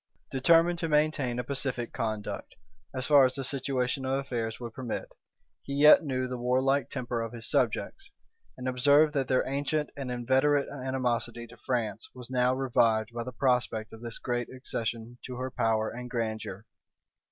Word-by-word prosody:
Determined 165 +5 +4
to 165 - -2
maintain 150 -5 +1
a 125 - -1
pacific 130 -3 -3
conduct, 110 -4 -4 0.4
as 130 -1 -4
far 145 -2 +7
as 130 0 +2
the 135 - -3
situation 135 -1 -1
of 130 0 -1
affairs 120 -5 -3
would 120 -2 -7
permit, 125 -2 -4 0.5
he 140 - -5
yet 150 +3 +8
knew 130 -3 -1
the 125 -1 -5
warlike 130 +3 +2
temper 120 -3 -3
of 115 0 -5
his 115 -1 -5
subjects, 395 0 -1 0.5
and 130 0 -5
observed 145 +4 +4
that 135 -3 0
their 130 -1 +2
ancient 145 +2 -1
and 135 -2 -5
inveterate 130 +4 +2
animosity 125 -3 -2
to 115 - -14
France 115 -5 -1
was 125 0 -9
now 125 0 +2
revived 115 -4 +2
by 120 0 -3
the 130 - -6
prospect 125 -4 0
of 110 - -11
this 115 -1 -5
great 120 -1 -2
accession 120 -2 -5
to 125 - -6
her 130 +1 -4
power 110 -2 +1
and 125 +1 -7
grandeur. 110 -3 -3
125 Hz, 170 wpm, -29 LUFS, 120-135 Hz, 0.5 s, yet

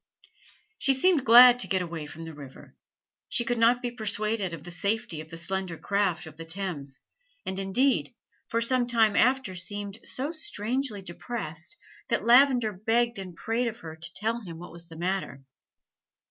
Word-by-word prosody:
She 270 - +4
seemed 320 0 +3
glad 245 +2 +9
to - - -3
get 185 -2 0
away 165 -3 -6
from 165 +2 -9
the 165 - -8
river. 140 -3 -13 0.5
She 240 - +2
could 240 -1 -1
not 240 +2 +4
be 245 - -1
persuaded 215 -3 -1
of 165 -3 -8
the 175 - -8
safety 190 -3 -1
of 155 - -12
the 165 - -7
slender 185 0 -2
craft 200 -3 0
of 155 -1 -12
the 165 - -7
Thames; 165 -6 -4 0.4
and 190 0 -3
indeed, 245 +8 +1 0.3
for 230 - 0
some 245 +1 +2
time 225 -3 +3
after 255 -4 +2
seemed 205 +3 -4
so 275 +4 -2
strangely 260 - -2
depressed 175 - -5 0.3
that - - -1
Lavender 245 -2 +5
begged 230 +4 0
and 185 -3 -8
prayed 225 +7 -1
of 230 0 -6
her 160 -1 -8
to 160 +1 -9
tell 225 +3 -1
him 170 -6 -9
what 175 +1 -10
was 170 0 -9
the 165 -1 -12
matter. 175 -6 -3
205 Hz, 175 wpm, -27 LUFS, 170-240 Hz, 0.5 s, glad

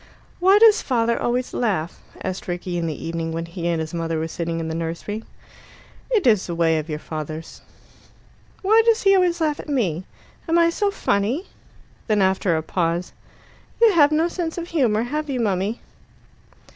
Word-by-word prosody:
"Why 380 +3 +6
does 440 -1 +6
father 235 -2 0
always 245 +1 -1
laugh?" 190 -8 -1 0.2
asked 185 +1 -4
Rickie 175 0 -4
in 165 - -1
the 155 0 -5
evening 165 0 -3
when 165 +1 -3
he 170 0 -5
and 170 -1 0
his 160 0 -4
mother 165 -1 -2
were 160 +1 -2
sitting 165 0 -3
in 165 - -3
the 160 - -3
nursery. 170 +7 -4 0.9
"It 450 -6 +1
is 215 -7 +3
a 170 - -2
way 165 -1 +2
of 155 +1 -7
your 150 - -2
father's." 155 +1 -7 1.0
"Why 435 +4 +5
does 460 0 +3
he 390 -1 +6
always 360 -2 +2
laugh 305 -2 0
at - - -8
me? 190 - 0 0.4
Am 330 - +3
I 335 0 +4
so 405 +4 0
funny?" 240 - 0 0.6
Then 215 -2 +2
after 190 -3 +2
a 160 - -3
pause, 170 +1 -1 0.7
"You 455 -3 +6
have 295 -4 +5
no 315 +2 +2
sense 340 -1 -4
of 345 0 -5
humour, 235 -9 +2
have 300 +5 -3
you, 260 -2 -1
mummy?" 205 0 -1
205 Hz, 185 wpm, -22 LUFS, -, 1.0 s, Why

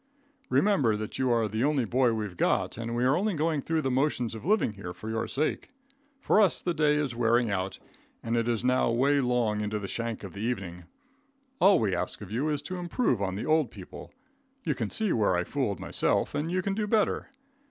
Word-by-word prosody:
Remember 145 - +3
that 110 0 -6
you 130 -1 +2
are 115 -2 +2
the 110 +3 -2
only 140 -3 +2
boy 125 +2 +2
we've 105 -4 -3
got, - - +1
and 115 +1 -4
we 120 - 0
are 130 +3 +4
only 200 +2 0
going 155 -1 0
through 160 +2 -1
the 135 - 0
motions 125 -3 0
of 110 - -8
living 205 - +2
here 95 -4 -7
for 110 +4 -7
your 110 0 -2
sake. 150 +3 -1 0.5
For 215 - +3
us 200 - +3
the 175 - -1
day 150 -2 +3
is 145 -5 -1
wearing 120 -1 +2
out, 95 -1 -2 0.5
and 115 0 -1
it 115 0 +1
is 120 -1 0
now 125 -1 +2
way 135 +5 +3
long 120 -4 +1
into 105 0 -2
the 100 -2 -5
shank 115 +1 -4
of 95 - -8
the 100 - -7
evening. 95 -7 -4 0.7
All 195 +1 +6
we 105 -4 0
ask 90 - -3
of 100 -2 -9
you 130 +8 0
is 150 -1 -1
to 185 +4 -5
improve 175 - 0
on 95 -1 -1
the 100 - -4
old 155 -5 +2
people. 95 -4 -11 0.5
You - - 0
can - - -3
see 220 -4 0
where 105 -5 +2
I 90 - +1
fooled 115 - -2
myself, - - 0
and 150 +3 -2
you 185 0 0
can 200 - -1
do 210 +1 -1
better. 215 +3 +1
120 Hz, 225 wpm, -28 LUFS, 110-150 Hz, 0.7 s, All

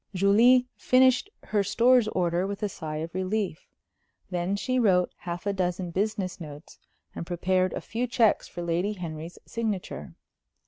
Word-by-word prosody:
Julie 230 +7 +5
finished 255 +7 +4
her 210 - +1
Stores 240 +3 +4
order 180 -2 0
with 200 +1 -5
a 210 - +1
sigh 155 -4 -6
of 165 +2 -5
relief. 185 -2 -2 0.6
Then 180 +2 -1
she 255 +5 0
wrote 185 -6 +3
half 175 +1 -6
a 200 - 0
dozen 180 -1 -2
business 195 0 -2
notes, 150 0 -10 0.3
and - - -5
prepared 185 +2 0
a - - -4
few 240 +3 -3
checks 230 -3 +2
for 175 - -7
Lady 175 +5 0
Henry's 165 -3 -7
signature. 205 - -4
190 Hz, 150 wpm, -27 LUFS, 175-220 Hz, 0.6 s, Julie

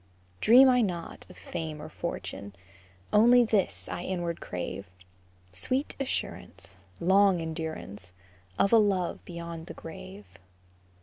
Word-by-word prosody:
Dream 250 - +8
I 250 -1 +5
not 175 -6 -4
of - - -14
fame 160 -2 -5
or 150 - -7
fortune, 100 - -6 0.6
Only 240 +3 +7
this 215 -4 0
I - - -4
inward 175 -2 -3
crave, 90 +2 -5 0.6
Sweet 255 - -1
assurance, 275 - -4 0.2
Long 190 +1 +4
endurance, 160 - -6 0.5
Of 200 - +3
a - - +9
love 195 -4 0
beyond 170 -1 -7
the - - -8
grave. 105 -11 -10
170 Hz, 120 wpm, -28 LUFS, 155-210 Hz, 0.6 s, a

